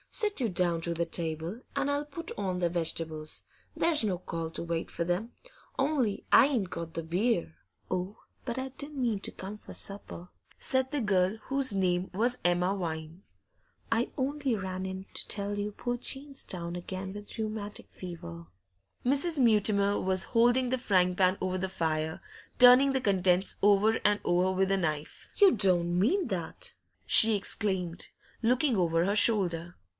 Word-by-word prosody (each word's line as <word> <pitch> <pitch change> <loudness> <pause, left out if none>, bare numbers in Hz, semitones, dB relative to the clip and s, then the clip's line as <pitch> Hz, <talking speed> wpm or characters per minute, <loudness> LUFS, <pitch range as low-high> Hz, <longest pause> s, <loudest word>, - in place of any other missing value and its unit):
Sit 420 - -1
you 235 - +1
down 175 -2 0
to 170 +1 -2
the 170 +1 0
table, 165 +5 -4
and 280 0 0
I'll 285 +1 0
put 305 +3 -7
on 190 -3 -2
the 175 -1 0
vegetables; 160 -2 -3 0.3
there's 320 -6 +2
no 195 -4 0
call 165 -2 -5
to 165 - -4
wait 170 -1 -3
for - - -2
them. 180 +7 -2 0.5
Only 270 -7 0
I 275 - +7
ain't 230 -10 -2
got 165 -1 -6
the 165 - -3
beer.' 170 - -1 0.3
'Oh, 185 +3 -3 0.3
but 240 -1 -4
I 260 0 -3
didn't 285 +2 -6
mean 230 -5 0
to - - -3
come 200 +3 -8
for - - -12
supper,' 195 -3 -4 0.3
said 260 0 -1
the 295 - -1
girl, 195 -2 +1
whose 270 -4 0
name 185 -1 0
was 240 +6 +1
Emma 180 +2 +2
Vine. 160 -1 -5 0.7
'I 230 +2 +1
only 275 -2 -1
ran 190 -2 -4
in 190 0 -6
to - - -1
tell 205 0 0
you 205 +1 -3
poor 245 +4 -3
Jane's 275 +2 -5
down 170 -1 -4
again 190 +2 -6
with 205 +2 -9
rheumatic 215 -2 -5
fever.' 85 - -9 0.6
Mrs. 285 +5 +1
Mutimer 205 -4 +3
was 190 0 +2
holding 245 +2 +4
the 260 - 0
frying 185 -6 +2
pan 185 +1 +2
over 185 0 -2
the 190 +1 -2
fire, 160 -3 -2 0.4
turning 250 +2 +7
the 265 - 0
contents 190 -3 +2
over 205 +2 +4
and 205 0 +3
over 180 +2 +2
with 190 +1 +1
a 195 - +2
knife. 155 -4 -4
'You 400 -3 +7
don't 175 -4 +2
mean 335 - +2
that!' 175 -4 -5 0.3
she 220 - +9
exclaimed, 190 -4 -1 0.3
looking 250 +3 +2
over 170 -2 +1
her 200 +2 0
shoulder. 180 -6 +4
195 Hz, 170 wpm, -29 LUFS, 175-240 Hz, 0.7 s, she